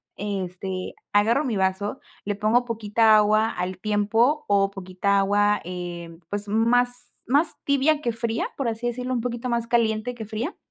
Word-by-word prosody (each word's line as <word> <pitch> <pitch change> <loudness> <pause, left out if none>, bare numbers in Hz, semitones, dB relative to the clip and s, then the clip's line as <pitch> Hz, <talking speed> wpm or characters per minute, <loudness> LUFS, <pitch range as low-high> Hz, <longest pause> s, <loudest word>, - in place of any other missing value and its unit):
Este, 190 -2 -4 0.2
agarro 225 +8 +3
mi 240 -5 -1
vaso, 190 +2 -1 0.3
le 205 0 -1
pongo 220 +4 +2
poquita 220 -1 +3
agua 215 +1 +3
al 180 -2 -4
tiempo 225 +9 +1
o 200 -1 +3
poquita 195 +1 -1
agua, 205 +1 +2
eh, 175 -1 -6
pues 205 0 -4
más 245 +3 +1 0.2
más 290 +7 +2
tibia 285 +2 +2
que 240 - 0
fría, 230 0 -2
por 275 - -1
así 230 +1 -2
decirlo, 250 +1 -3
un 240 - 0
poquito 240 0 -3
más 235 -1 -1
caliente 230 0 +1
que 220 - -7
fría. 220 - -4
215 Hz, 165 wpm, -24 LUFS, 200-240 Hz, 0.3 s, agarro